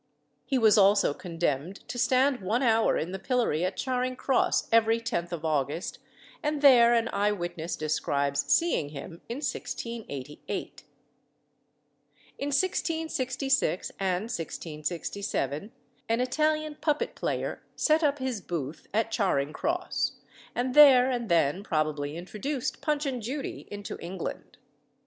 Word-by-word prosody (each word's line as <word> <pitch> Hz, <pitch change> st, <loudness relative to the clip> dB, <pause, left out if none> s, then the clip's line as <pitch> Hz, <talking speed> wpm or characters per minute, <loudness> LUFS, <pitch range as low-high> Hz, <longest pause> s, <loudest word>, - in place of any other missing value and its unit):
He 270 Hz, -, +1 dB
was 220 Hz, -3 st, +5 dB
also 200 Hz, -5 st, +5 dB
condemned 170 Hz, 0 st, -3 dB
to 245 Hz, -, -5 dB
stand 260 Hz, 0 st, +3 dB
one 220 Hz, +8 st, 0 dB
hour 225 Hz, -2 st, +3 dB
in 170 Hz, -, -3 dB
the 190 Hz, -, -4 dB
pillory 235 Hz, -, 0 dB
at 185 Hz, +1 st, -1 dB
Charing 255 Hz, -1 st, -1 dB
Cross 260 Hz, 0 st, +1 dB
every 225 Hz, 0 st, +4 dB
10th 175 Hz, -7 st, -3 dB
of 165 Hz, -2 st, -4 dB
August, 150 Hz, +2 st, -1 dB, 0.4 s
and 295 Hz, -1 st, -1 dB
there 240 Hz, -4 st, +7 dB
an 230 Hz, 0 st, +2 dB
eye 205 Hz, +1 st, +2 dB
witness 175 Hz, -3 st, -3 dB
describes 140 Hz, -2 st, 0 dB
seeing 330 Hz, -, +2 dB
him 155 Hz, +4 st, -9 dB
in 235 Hz, -, -3 dB
1688. 230 Hz, -, -5 dB, 1.6 s
In 280 Hz, -, -2 dB
1666 280 Hz, -, 0 dB
and 190 Hz, -1 st, 0 dB
1667 165 Hz, -, -4 dB, 0.4 s
an 230 Hz, +1 st, +2 dB
Italian 305 Hz, +4 st, +1 dB
puppet 300 Hz, -1 st, 0 dB
player -, -, -3 dB
set 310 Hz, +1 st, +3 dB
up 290 Hz, -2 st, +2 dB
his 260 Hz, -6 st, -3 dB
booth 160 Hz, -4 st, -5 dB
at 225 Hz, +1 st, +1 dB
Charing 155 Hz, -, +1 dB
Cross, 355 Hz, -, -1 dB, 0.4 s
and 250 Hz, +1 st, -1 dB
there 265 Hz, -3 st, +8 dB
and 240 Hz, -3 st, -2 dB
then 170 Hz, +2 st, +2 dB
probably 155 Hz, -3 st, -1 dB
introduced 215 Hz, -, -4 dB
"Punch 300 Hz, -1 st, 0 dB
and 260 Hz, -3 st, -2 dB
Judy" 270 Hz, +6 st, -5 dB
into 205 Hz, 0 st, -6 dB
England. 180 Hz, +1 st, -6 dB
220 Hz, 130 wpm, -28 LUFS, 170-260 Hz, 1.6 s, there